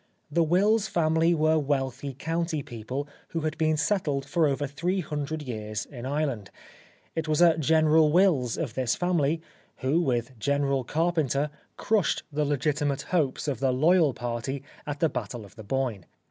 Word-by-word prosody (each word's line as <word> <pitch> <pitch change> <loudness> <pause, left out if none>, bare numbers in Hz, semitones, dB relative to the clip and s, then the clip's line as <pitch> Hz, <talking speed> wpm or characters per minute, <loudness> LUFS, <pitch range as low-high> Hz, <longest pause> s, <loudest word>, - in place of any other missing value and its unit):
The 170 - +2
Wills 200 +7 +3
family 165 -1 +2
were 155 0 +3
wealthy 135 -2 -2
county 165 0 -2
people 125 +5 -5 0.2
who 165 - -3
had 155 0 -2
been 155 -1 +2
settled 150 -4 0
for 165 +1 +2
over 145 +1 0
three 175 +7 -1
hundred 150 0 -4
years 110 -5 -4
in 125 -2 -8
Ireland. 140 -7 -2 0.7
It 160 -1 -2
was 155 -1 +1
a 170 -2 +6
General 155 0 +4
Wills 155 - +3
of 140 -9 -3
this 125 -2 0
family, 165 -3 +1 0.3
who, 140 +6 +1
with 125 -4 -1
General 140 +1 +1
Carpenter, 150 -1 0 0.3
crushed 205 -9 +1
the 150 +1 0
legitimate 145 0 0
hopes 150 -5 +1
of 135 -6 -1
the 135 0 +2
loyal 155 +2 +4
party 120 +3 -4 0.2
at 145 0 -4
the 165 - +5
Battle 115 -5 -5
of 100 - -17
the 110 - -10
Boyne. 120 -4 -2
145 Hz, 160 wpm, -27 LUFS, 130-160 Hz, 0.7 s, a